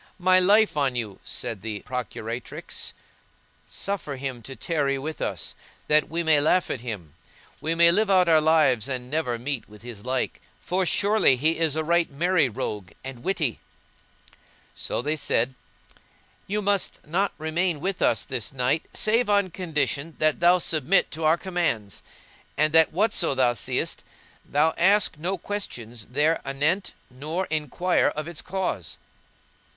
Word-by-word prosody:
"My 185 0 +4
life 205 +2 +4
on 135 -3 +1
you," 110 -5 -3
said 105 -5 -4
the 105 -1 -5
procuratrix, 120 -1 -6 0.7
"suffer 195 -8 -4
him 130 -2 -5
to 135 +4 -8
tarry 140 0 -1
with 155 +4 -6
us, - - -3 0.3
that 150 0 +3
we 170 +1 -1
may 160 -2 +5
laugh 180 +4 +2
at - - -4
him: 100 - -6 0.5
we 165 +1 -1
may 170 0 +7
live 210 +3 +2
out 185 -2 +4
our 160 -2 +5
lives 150 -7 +3
and 125 -1 -4
never 150 -6 -1
meet 130 0 -4
with 105 0 -15
his 115 -4 -9
like, 130 +1 -2 0.2
for 185 0 -1
surely 205 -8 +4
he 155 +6 +1
is 160 -3 +2
a 160 - 0
right 170 +1 +2
merry 160 0 +2
rogue 105 -4 -5
and 130 -2 -8
a - - -16
witty."[FN#165] 165 - -5 0.4
So - - -3
they 150 +2 0
said, 130 -4 +1 1.0
"Thou 210 +1 0
must 200 -1 0
not 185 +6 0
remain 160 +1 -1
with 185 +4 -3
us - - +2
this 125 -6 -3
night 135 +4 0
save 225 +2 +2
on 200 -3 +2
condition 160 -3 -2
that 155 -1 +2
thou 175 +1 +5
submit 165 +1 +1
to 160 0 -4
our 160 +2 +4
commands, 170 - -2 0.6
and 155 +1 +3
that 160 -1 +7
whatso 185 -5 +1
thou 125 -2 +3
seest, 115 - -2 0.4
thou 155 +3 +2
ask 195 -2 +3
no 185 +4 -1
questions 120 - -6
there 150 +6 +1
anent, 150 +8 0 0.2
nor 155 +8 -3
enquire 155 +4 +1
of 155 +1 -5
its 170 -3 -5
cause." 185 - -3
155 Hz, 155 wpm, -25 LUFS, 130-180 Hz, 1.0 s, may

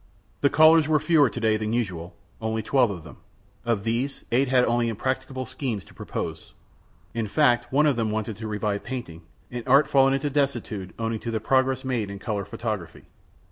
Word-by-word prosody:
The 140 - +3
callers 155 0 +6
were 155 -1 +3
fewer 155 -3 +4
to 120 - -6
day 110 -2 +2
than 110 +1 -2
usual 90 -8 -3 0.3
only 110 0 -2
twelve 125 0 +3
of 90 -5 -6
them. 75 -4 -12 0.5
Of 115 -4 0
these, 120 +5 -2
eight 130 +4 +3
had 125 -1 +4
only 120 0 +1
impracticable 130 +3 -3
schemes 130 -5 -4
to - - -18
propose. - - -6 0.6
In 115 -2 -2
fact, 120 0 +2
one 145 +3 +4
of 145 -5 +2
them 110 -2 0
wanted 110 0 -2
to 110 0 -6
revive 105 -1 -2
painting, 120 -11 -6 0.3
an 120 0 -4
art 140 +3 +6
fallen 135 -1 +4
into 140 +1 -2
desuetude 130 -9 -2
owing 115 -1 -2
to 120 - -5
the 115 -1 -1
progress 130 +3 +1
made 120 -6 -1
in 100 - -6
color 100 -1 -3
photography. 105 -5 -5
120 Hz, 190 wpm, -25 LUFS, 110-135 Hz, 0.6 s, callers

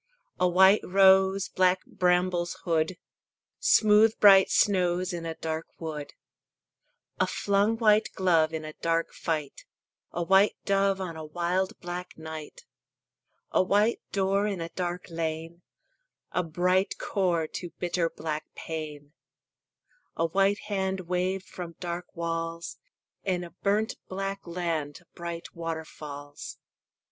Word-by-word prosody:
A 180 - +4
white 190 +3 +6
rose 190 0 +5
Black 185 0 +2
brambles 180 -1 +1
hood; 165 +1 0 0.6
Smooth 215 +1 +5
bright 195 -2 +8
snows 185 -2 +2
In 170 -1 -4
a 165 - -4
dark 160 0 -4
wood. 150 -3 -6 1.1
A - - +3
flung 205 +3 +1
white 215 -1 +4
glove 165 -4 +3
In 160 -1 -4
a 155 - -7
dark 165 +1 -1
fight; 155 -4 -3 0.5
A 175 - -2
white 195 +3 +4
dove 195 -1 +2
On 180 -3 -4
a 160 - -7
wild 175 +4 -1
black 175 +1 -6
night. 160 - -8 0.9
A - - +4
white 205 +5 +2
door 195 +1 +1
In 200 -3 -2
a 165 0 -4
dark 175 0 -4
lane; 165 +1 -4 0.7
A - - +1
bright 180 +3 +1
core 175 -5 0
To 175 +3 -6
bitter 175 -1 0
black 155 -1 -4
pain. 150 -2 -6 1.0
A 165 - +1
white 195 +4 +2
hand 190 -2 -2
Waved 185 +2 -1
from 170 -2 -8
dark 175 0 -4
walls; 165 0 -3 0.5
In 180 -2 -1
a 170 - -9
burnt 210 +3 0
black 195 +1 -3
land 165 -4 -3
Bright 170 -1 -6
waterfalls. 155 -3 -7
180 Hz, 125 wpm, -28 LUFS, 165-190 Hz, 1.1 s, bright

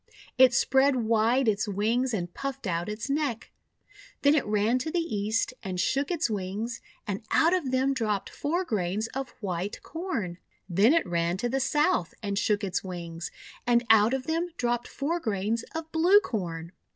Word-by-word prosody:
It 255 -1 +7
spread 265 +2 +3
wide 230 +2 +2
its 215 0 +1
wings 225 +6 +1
and 175 -6 -3
puffed 275 -2 -5
out 175 0 -1
its 215 +4 -4
neck. 275 -5 -2 0.7
Then 285 +1 +6
it 300 - +3
ran 215 +4 +2
to 265 - -3
the 345 - 0
East 220 -7 -1
and 185 -2 -4
shook 275 +8 +1
its 345 -7 +1
wings, 215 +3 -3 0.2
and 200 0 -3
out 330 +2 +4
of 350 -8 0
them 260 +1 +2
dropped 215 -6 -1
four 345 +6 -1
grains 205 - -1
of 270 -1 -4
White 185 0 -3
Corn. 255 - -4 0.3
Then 200 - +4
it 335 - +2
ran 170 0 0
to 240 +5 -1
the 270 +2 0
South 270 - +1
and 200 -1 -1
shook 210 0 +1
its 190 -2 -1
wings, 170 -2 -6 0.4
and 240 0 +4
out 220 +3 +5
of 260 -1 -4
them 330 +3 -1
dropped 240 -1 0
four 325 +5 -2
grains 220 - -1
of 320 0 -5
Blue 350 +6 +6
Corn. 170 - -4
230 Hz, 175 wpm, -28 LUFS, 200-275 Hz, 0.7 s, It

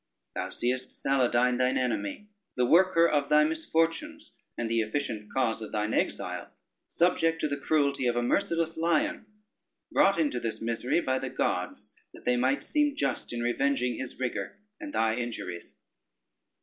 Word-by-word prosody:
Thou - - -3
seest 130 +1 -1
Saladyne 125 -2 +2
thine 130 0 +2
enemy, 125 - -2 0.3
the 125 - +3
worker 170 +3 +5
of 145 -3 0
thy 150 0 +6
misfortunes, 165 - -1 0.3
and 120 - -2
the 115 0 +1
efficient 110 -2 -3
cause 115 -4 0
of 110 - -7
thine 105 +1 -1
exile, - - -2 0.4
subject 165 -2 +2
to 155 - 0
the 140 - -2
cruelty 140 -3 +1
of 120 - +1
a 120 - +1
merciless 165 +2 0
lion, 165 +5 0 0.6
brought 195 -3 +4
into 145 -6 +1
this 115 -2 -3
misery 115 +7 0
by 130 -3 0
the - - -4
gods, - - -2 0.2
that - - -15
they 125 - +3
might 130 +3 +1
seem 295 -1 +1
just - - -2
in 120 0 -3
revenging 125 -1 0
his 130 - -6
rigor, 120 -6 -3 0.2
and 300 - -7
thy 110 - +1
injuries. 115 -8 -5
130 Hz, 160 wpm, -28 LUFS, 120-165 Hz, 0.6 s, thy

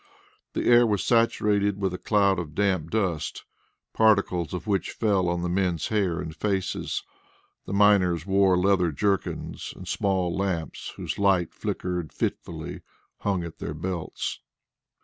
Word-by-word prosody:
The - - -2
air 120 0 +6
was 105 -3 0
saturated 105 -4 +2
with 95 -2 0
a 90 - -5
cloud 100 -3 +2
of 80 -3 -6
damp 95 -6 +1
dust, 90 -8 -1 0.5
particles 100 -6 +3
of 90 - -5
which 100 -5 -1
fell 100 -5 +1
on 85 0 -1
the - - 0
men's 90 -2 0
hair 95 -6 +1
and 80 -1 -6
faces. 95 -3 -2 0.6
The - - -4
miners 95 -5 +4
wore 95 -2 +4
leather 90 -2 +3
jerkins, 100 +5 -2
and - - -10
small 95 -3 0
lamps, 95 -5 -3
whose - - -5
light 95 -4 +2
flickered 90 -3 -3
fitfully, - - -4 0.4
hung 95 -3 0
at 85 -1 -8
their 75 - -4
belts. 85 +1 -4
95 Hz, 145 wpm, -26 LUFS, 85-100 Hz, 0.6 s, air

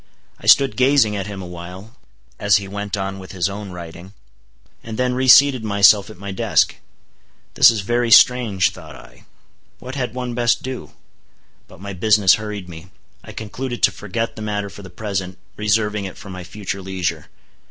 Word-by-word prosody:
I - - -10
stood 135 -1 +5
gazing 130 -5 +3
at 100 -1 -4
him 100 -2 -7
awhile, 90 +5 -10 0.4
as 100 -2 +3
he 100 0 0
went 100 +1 -4
on 95 0 -4
with 95 0 -11
his 90 -2 0
own 100 0 -7
writing, 85 +2 -10 0.7
and 110 -1 -7
then 125 0 0
reseated 130 0 +5
myself 100 -1 +4
at 110 - -12
my 100 +2 -7
desk. 100 -4 +1 0.8
This - - +7
is 110 -3 -1
very 120 +4 0
strange, 115 -6 +5
thought 80 -4 -12
I. - - -17 0.5
What 130 +1 -9
had 125 -4 -4
one 125 -1 -4
best 120 0 +1
do? 130 -1 -7 0.7
But - - -16
my 100 0 -6
business 100 -1 +4
hurried 105 -3 -6
me. 85 +1 -11 0.3
I - - -11
concluded 120 +3 -6
to - - +5
forget 105 +3 -4
the 110 - -8
matter 105 -2 -3
for 100 - -11
the 95 - -11
present, 95 -1 -5 0.2
reserving 105 0 0
it 95 - -8
for 100 - -11
my 90 -1 -8
future 100 +1 -6
leisure. 90 -4 -4
100 Hz, 175 wpm, -20 LUFS, 95-115 Hz, 0.8 s, This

